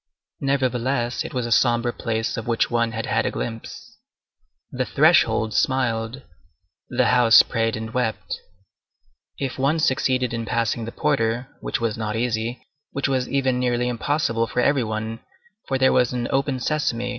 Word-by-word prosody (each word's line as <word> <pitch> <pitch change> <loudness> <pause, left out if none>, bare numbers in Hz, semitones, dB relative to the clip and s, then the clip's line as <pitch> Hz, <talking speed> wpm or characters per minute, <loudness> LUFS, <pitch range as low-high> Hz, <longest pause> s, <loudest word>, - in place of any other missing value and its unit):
Nevertheless, 130 -2 0
it - - -7
was 125 -2 -2
a 120 - -4
sombre 120 0 +3
place 110 -1 -2
of 115 +1 -5
which 115 0 +1
one 115 -1 +1
had 115 0 -4
had 110 +2 0
a - - +1
glimpse. 115 -1 -7 0.7
The - - -1
threshold 110 -1 +3
smiled; 125 0 0 0.7
the - - +2
house 120 -2 +7
prayed 115 -2 -1
and 110 +1 -6
wept. 125 -3 -2 1.0
If 135 -1 -4
one 140 +4 +2
succeeded 130 -4 +1
in 115 -1 -3
passing 115 -1 -1
the 115 - -6
porter, 125 -3 0
which - - -3
was 115 -1 -2
not 105 -1 -2
easy,—which 120 +4 -3
was 130 -2 -1
even 130 -2 +1
nearly 125 -1 0
impossible 115 -1 0
for 125 - -3
every 135 +1 +3
one, 110 +1 -4 0.5
for 135 - 0
there 130 0 +4
was 125 -2 +3
an 120 -1 -2
_open 135 -1 0
sesame! 125 -3 -1
120 Hz, 155 wpm, -23 LUFS, 115-130 Hz, 1.0 s, house